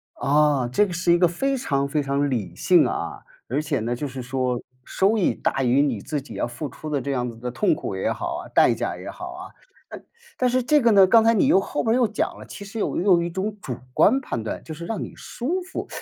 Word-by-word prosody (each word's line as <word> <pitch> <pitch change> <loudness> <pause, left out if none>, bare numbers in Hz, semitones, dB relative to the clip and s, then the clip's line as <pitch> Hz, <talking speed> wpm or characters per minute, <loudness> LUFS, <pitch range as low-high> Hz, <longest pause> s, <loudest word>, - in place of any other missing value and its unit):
啊， 145 -2 +2
这 165 +12 +2
个 185 - -6
是 170 0 +2
一 175 - +4
个 175 -1 +4
非 270 +11 -1
常 140 - -1
非 150 +1 0
常 140 +1 0
理 115 -6 -3
性 - - +4
啊， - - -4 0.3
而 140 +6 -1
且 145 -2 -1
呢， 120 +2 -2
就 145 +4 -4
是 130 0 -7
说， 125 -1 -2 0.2
收 200 +4 +1
益 195 - +2
大 135 - -1
于 125 +2 +3
你 130 -8 +1
自 150 +6 -3
己 135 - -11
要 - - -1
付 120 +5 -6
出 150 +4 -8
的 145 -2 0
这 140 0 -3
样 125 -2 -1
子 115 - -12
的 125 +2 -5
痛 165 - +1
苦 - - -5
也 - - -1
好 - - -4
啊、 - - -7
代 - - +5
价 - - -3
也 - - -9
好 - - -8
啊。 - - -8 0.9
那 255 - +3
但 - - +2
是 255 0 +1
这 300 +2 +4
个 230 -1 +4
呢， 195 -2 +7
刚 225 +3 +6
才 230 - +4
你 230 - +3
又 195 - +5
后 - - -3
面 225 - +2
又 250 -2 +3
讲 215 - -1
了， - - -10
其 200 - -9
实 200 +3 -7
有 - - -1
又 - - 0
有 170 - +4
一 170 - -2
种 195 +4 -3
主 125 - -4 0.2
观 265 +6 +4
判 115 - -4
断， 110 - -5
就 160 - -7
是 170 +2 -8
让 220 +1 -3
你 - - -8
舒 330 +10 -3
服。 365 +1 -6
155 Hz, 285 characters per minute, -23 LUFS, 135-215 Hz, 0.9 s, 呢